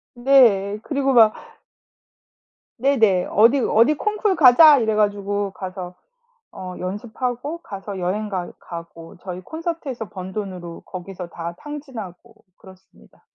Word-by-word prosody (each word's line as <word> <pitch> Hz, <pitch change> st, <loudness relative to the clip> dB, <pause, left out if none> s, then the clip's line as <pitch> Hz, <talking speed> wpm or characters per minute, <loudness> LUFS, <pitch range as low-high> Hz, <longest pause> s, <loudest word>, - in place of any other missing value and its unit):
네. 235 Hz, -6 st, +4 dB
그리고 275 Hz, -2 st, 0 dB
막 220 Hz, -3 st, +6 dB, 1.5 s
네네. 225 Hz, -9 st, +3 dB
어디 230 Hz, +7 st, +5 dB
어디 235 Hz, +4 st, +3 dB
콩쿨 420 Hz, +3 st, 0 dB
가자 300 Hz, +1 st, +8 dB
이래 220 Hz, -3 st, +1 dB
가지고 205 Hz, -1 st, 0 dB
가서 185 Hz, -1 st, -7 dB, 0.6 s
어 185 Hz, -1 st, -8 dB
연습하고 245 Hz, -, -4 dB
가서 200 Hz, -, -8 dB
여행 195 Hz, +4 st, -2 dB
가 185 Hz, -4 st, -4 dB
가고 170 Hz, -1 st, -10 dB
저희 180 Hz, -1 st, -6 dB
콘서트에서 315 Hz, -, -5 dB
번 190 Hz, -2 st, -8 dB
돈으로 180 Hz, -5 st, -6 dB
거기서 185 Hz, -1 st, -8 dB
다 170 Hz, 0 st, -7 dB
탕진하고 235 Hz, -, -9 dB, 0.2 s
그렇습니다. 190 Hz, -1 st, -20 dB
210 Hz, 260 characters per minute, -21 LUFS, 185-265 Hz, 1.5 s, 가자